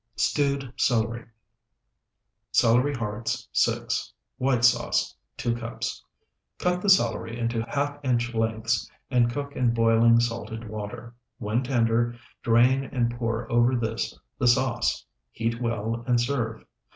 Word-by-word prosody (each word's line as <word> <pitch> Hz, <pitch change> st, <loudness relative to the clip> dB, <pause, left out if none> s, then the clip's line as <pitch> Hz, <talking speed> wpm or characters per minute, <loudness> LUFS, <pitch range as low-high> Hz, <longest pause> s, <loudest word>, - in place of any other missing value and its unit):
STEWED 140 Hz, +3 st, 0 dB
CELERY 115 Hz, -1 st, +1 dB, 1.3 s
Celery 125 Hz, +5 st, +3 dB
hearts, 110 Hz, -1 st, -3 dB
6. -, -, 0 dB, 0.3 s
White 130 Hz, -2 st, +2 dB
sauce, 120 Hz, 0 st, +2 dB, 0.2 s
2 120 Hz, -1 st, -1 dB
cups. 115 Hz, 0 st, -5 dB, 0.5 s
Cut 180 Hz, 0 st, 0 dB
the 205 Hz, -, +1 dB
celery 115 Hz, -9 st, +3 dB
into 115 Hz, -1 st, -1 dB
half 145 Hz, 0 st, -1 dB
inch 120 Hz, -2 st, 0 dB
lengths 110 Hz, 0 st, 0 dB, 0.2 s
and 120 Hz, -2 st, +3 dB
cook 140 Hz, +2 st, -5 dB
in 120 Hz, -2 st, +1 dB
boiling, 115 Hz, 0 st, +5 dB
salted 115 Hz, -1 st, -3 dB
water. 110 Hz, +2 st, -7 dB, 0.2 s
When 110 Hz, +4 st, -1 dB
tender, 120 Hz, -2 st, +1 dB, 0.3 s
drain 125 Hz, +4 st, +4 dB
and 120 Hz, -3 st, 0 dB
pour 115 Hz, -1 st, -2 dB
over 120 Hz, +2 st, +4 dB
this 115 Hz, -1 st, -2 dB, 0.2 s
the 130 Hz, -, +2 dB
sauce. 120 Hz, -1 st, +2 dB, 0.3 s
Heat 115 Hz, +1 st, -2 dB
well, 115 Hz, 0 st, -2 dB
and 120 Hz, -1 st, +3 dB
serve. 120 Hz, -3 st, -2 dB
120 Hz, 125 wpm, -26 LUFS, 115-125 Hz, 1.3 s, boiling